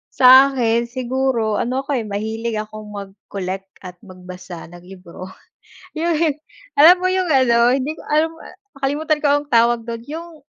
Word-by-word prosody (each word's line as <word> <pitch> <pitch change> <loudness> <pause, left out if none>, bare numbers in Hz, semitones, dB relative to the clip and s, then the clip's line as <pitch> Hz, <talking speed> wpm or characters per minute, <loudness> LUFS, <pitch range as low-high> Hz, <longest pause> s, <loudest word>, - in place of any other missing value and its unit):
Sa'kin 255 -3 +5
siguro 245 -3 -1
ano 255 +2 -1
ako 275 0 -3
eh, 230 - -2
mahilig 220 +3 -4
akong 215 0 -9
mag-collect 195 -1 -7
at 180 -1 -10
magbasa 180 -2 -11
ng 175 +1 -14
libro. 185 -1 -11 0.7
Yung 335 +1 0 0.6
alam 325 +5 +9
mo 370 - +1
yung 370 -1 0
ano, 245 -4 +3
hindi 280 +4 -3
ko - - -11
alam, 310 +2 +1
ah, - - -13 0.2
nakalimutan 300 +3 -1
ko 300 - -1
anong 290 0 -3
tawag 235 0 +3
dun, 230 0 -6
yung 320 -1 -9
240 Hz, 155 wpm, -19 LUFS, 205-285 Hz, 0.7 s, alam